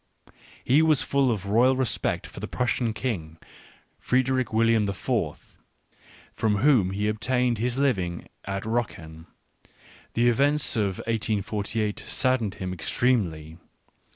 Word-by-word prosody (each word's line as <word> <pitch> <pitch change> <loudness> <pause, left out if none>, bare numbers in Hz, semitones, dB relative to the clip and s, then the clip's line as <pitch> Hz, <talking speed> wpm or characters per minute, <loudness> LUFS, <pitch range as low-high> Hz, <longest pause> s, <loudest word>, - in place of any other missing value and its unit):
He 140 +5 +4
was 155 -3 +3
full 140 -2 +2
of 105 -5 -2
loyal 120 +6 +4
respect 130 -3 -1
for - - -10
the - - -5
Prussian 120 -1 -1
King, 95 -9 -4 0.6
Frederick 130 -1 +1
William 115 -1 +3
the 100 - -3
Fourth, - - -3 0.7
from 110 -2 +1
whom 115 -4 +4
he 100 +2 -1
obtained 120 +2 0
his 120 +2 -1
living 95 -12 0 0.2
at 100 0 -3
Rocken; 85 -9 -4 0.9
the 120 +1 +3
events 140 +5 +2
of 100 -4 0
1848 105 -1 -2
saddened 130 -6 0
him 95 -1 -4
extremely. 85 -5 -1
110 Hz, 125 wpm, -26 LUFS, 100-125 Hz, 0.9 s, He